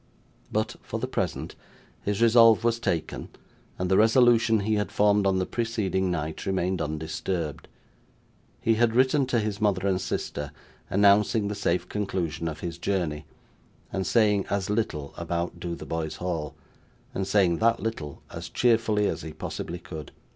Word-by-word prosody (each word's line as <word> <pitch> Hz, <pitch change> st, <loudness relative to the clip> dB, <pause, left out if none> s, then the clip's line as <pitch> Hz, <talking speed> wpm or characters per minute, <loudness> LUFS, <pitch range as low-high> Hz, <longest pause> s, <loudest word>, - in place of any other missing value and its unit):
But, -, -, -1 dB
for -, -, -5 dB
the -, -, -1 dB
present, -, -, -3 dB, 0.5 s
his 105 Hz, +2 st, 0 dB
resolve 115 Hz, -1 st, +6 dB
was 115 Hz, 0 st, +2 dB
taken, 85 Hz, -8 st, -2 dB, 0.5 s
and 90 Hz, -, -1 dB
the 95 Hz, +1 st, +3 dB
resolution 115 Hz, -1 st, +5 dB
he 110 Hz, +2 st, 0 dB
had 105 Hz, -1 st, 0 dB
formed 105 Hz, -1 st, +3 dB
on 95 Hz, -1 st, +2 dB
the 95 Hz, -, 0 dB
preceding 105 Hz, -6 st, -1 dB
night 80 Hz, -3 st, -3 dB
remained 95 Hz, -1 st, 0 dB
undisturbed. 80 Hz, +1 st, -3 dB, 0.9 s
He 115 Hz, -, +2 dB
had 115 Hz, 0 st, +2 dB
written 130 Hz, +2 st, +3 dB
to 125 Hz, -, +1 dB
his 105 Hz, -1 st, -3 dB
mother 100 Hz, -2 st, +2 dB
and 95 Hz, -1 st, +1 dB
sister, 75 Hz, -3 st, -3 dB, 0.4 s
announcing 100 Hz, +1 st, +4 dB
the -, -, -2 dB
safe 90 Hz, -3 st, 0 dB
conclusion 90 Hz, -5 st, -2 dB
of 75 Hz, -1 st, -5 dB
his 85 Hz, -1 st, -5 dB
journey, 85 Hz, -6 st, -1 dB, 0.7 s
and 95 Hz, -1 st, -1 dB
saying 105 Hz, -4 st, +3 dB
as 100 Hz, 0 st, -1 dB
little 75 Hz, -10 st, -2 dB
about 85 Hz, +1 st, -3 dB
Dotheboys 80 Hz, -2 st, -4 dB
Hall, 85 Hz, -4 st, -3 dB, 0.6 s
and 95 Hz, 0 st, -2 dB
saying 95 Hz, -5 st, +3 dB
that 115 Hz, +1 st, +3 dB
little 80 Hz, -11 st, -5 dB
as -, -, -7 dB
cheerfully, 115 Hz, -3 st, +2 dB
as -, -, -1 dB
he 80 Hz, 0 st, -7 dB
possibly 85 Hz, +2 st, -5 dB
could. 80 Hz, -4 st, -9 dB
95 Hz, 155 wpm, -26 LUFS, 85-110 Hz, 0.9 s, resolve